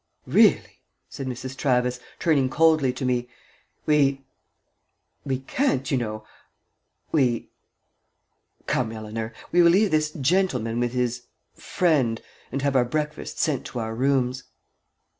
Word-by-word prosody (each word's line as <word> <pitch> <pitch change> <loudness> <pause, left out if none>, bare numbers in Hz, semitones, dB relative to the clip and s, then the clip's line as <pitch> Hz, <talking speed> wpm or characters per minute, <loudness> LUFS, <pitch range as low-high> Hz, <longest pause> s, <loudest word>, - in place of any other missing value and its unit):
"Really," - - +3 0.3
said 135 - -6
Mrs. 130 +1 -5
Travis, 125 -2 +1 0.2
turning 140 -6 +2
coldly 155 -2 +3
to 130 +1 -5
me, 125 -1 0 0.6
"we 140 -3 +2 1.0
we 135 -2 -2
can't, 135 - -1
you - - +3
know 110 -3 -3 0.9
we 125 -7 +1 1.1
Come, 110 - 0
Eleanor. 110 0 -5 0.2
We 175 - +5
will 170 - +6
leave 195 +4 +3
this 155 -1 +2
gentleman 130 - 0
with 120 0 -1
his 125 -1 -2 0.3
friend, 145 - +1 0.3
and 135 +1 -3
have 140 -1 +1
our 130 - +5
breakfast 150 +4 -4
sent 155 -5 0
to 125 - -6
our 110 -1 -3
rooms." 130 0 0
130 Hz, 125 wpm, -24 LUFS, 120-150 Hz, 1.1 s, will